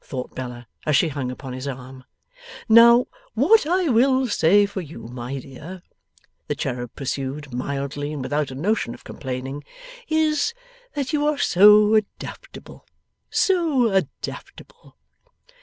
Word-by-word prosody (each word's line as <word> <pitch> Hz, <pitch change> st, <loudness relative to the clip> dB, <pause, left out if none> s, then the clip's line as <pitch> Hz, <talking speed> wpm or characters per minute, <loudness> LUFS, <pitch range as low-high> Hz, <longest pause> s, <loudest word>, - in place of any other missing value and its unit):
thought 130 Hz, -2 st, -6 dB
Bella, 125 Hz, -2 st, -7 dB, 0.2 s
as 150 Hz, -3 st, +2 dB
she 165 Hz, -, +2 dB
hung 140 Hz, -3 st, -4 dB
upon 125 Hz, 0 st, -7 dB
his 130 Hz, +2 st, -6 dB
arm. 130 Hz, -1 st, -8 dB, 0.6 s
'Now, 235 Hz, +2 st, +7 dB, 0.3 s
what 445 Hz, -8 st, +4 dB
I 360 Hz, +1 st, +1 dB
will 260 Hz, +2 st, +3 dB
say 205 Hz, 0 st, +4 dB
for 200 Hz, -1 st, -5 dB
you, 150 Hz, -7 st, -10 dB
my 125 Hz, +3 st, -6 dB
dear,' 155 Hz, +8 st, -10 dB, 0.6 s
the -, -, -2 dB
cherub 120 Hz, -2 st, -4 dB
pursued 135 Hz, 0 st, -4 dB
mildly 140 Hz, +3 st, -3 dB
and 145 Hz, -3 st, -5 dB
without 145 Hz, +2 st, -1 dB
a 130 Hz, -, -8 dB
notion 170 Hz, -, -1 dB
of -, -, -18 dB
complaining, 135 Hz, +1 st, -6 dB, 0.4 s
'is, 315 Hz, +7 st, +1 dB, 0.4 s
that 280 Hz, 0 st, -3 dB
you 295 Hz, 0 st, +1 dB
are 300 Hz, -1 st, +1 dB
so 210 Hz, 0 st, +6 dB
adaptable. 220 Hz, -, -4 dB, 0.5 s
So 315 Hz, -, +2 dB
adaptable. 190 Hz, -1 st, -5 dB
150 Hz, 135 wpm, -23 LUFS, -, 0.6 s, Now